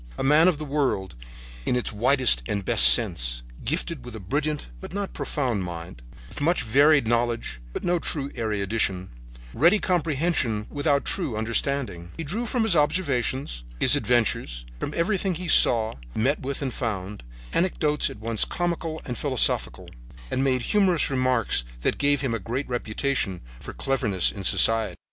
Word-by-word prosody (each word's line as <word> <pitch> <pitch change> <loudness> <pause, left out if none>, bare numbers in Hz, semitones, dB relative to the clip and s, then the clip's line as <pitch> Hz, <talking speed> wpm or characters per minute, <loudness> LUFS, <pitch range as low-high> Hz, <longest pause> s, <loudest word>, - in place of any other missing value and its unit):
A - - -3
man 150 +5 +5
of 180 -5 +2
the 155 - -6
world 135 -10 -1 0.5
in 125 - 0
its 125 - -1
widest 125 - +3
and 100 -2 -3
best - - +9
sense, - - +2 0.2
gifted 155 +1 -3
with 120 -1 -9
a - - -7
brilliant, 145 +9 -3
but - - -10
not 200 0 -4
profound, 125 - -2
mind, 85 -5 -8 0.3
with 85 - -10
much 170 +4 +1
varied 140 +4 +4
knowledge, 115 - -1
but - - -6
no 175 0 +1
true 140 -4 -3
erudition, 100 -3 -2 0.4
ready 170 - +4
comprehension 155 - -1
without 145 -1 0
true 155 - -1
understanding, 110 -6 -2
he 165 - -4
drew 215 +11 -3
from 240 0 0
his 220 -6 +2
observations, 140 - -1 0.2
his - - +4
adventures, 105 - 0
from - - -4
everything 190 +1 0
he 180 +2 -6
saw, 115 -7 +5 0.2
met 135 +7 0
with 140 +2 -4
and 130 -3 -3
found, 105 -4 -4 0.3
anecdotes 155 -4 0
at - - -10
once 110 0 +1
comical 170 -2 -3
and 125 -2 -5
philosophical, 135 -5 +1 0.4
and 130 - 0
made 130 -2 0
humorous 185 - +2
remarks 130 - +1 0.2
that - - -1
gave 145 -1 +2
him 135 -4 -2
a 115 - -2
great 120 +7 -4
reputation 120 -4 -2 0.2
for - - -9
cleverness 100 - +1
in 100 - -8
society. 115 +3 +3
130 Hz, 160 wpm, -24 LUFS, 110-155 Hz, 0.5 s, best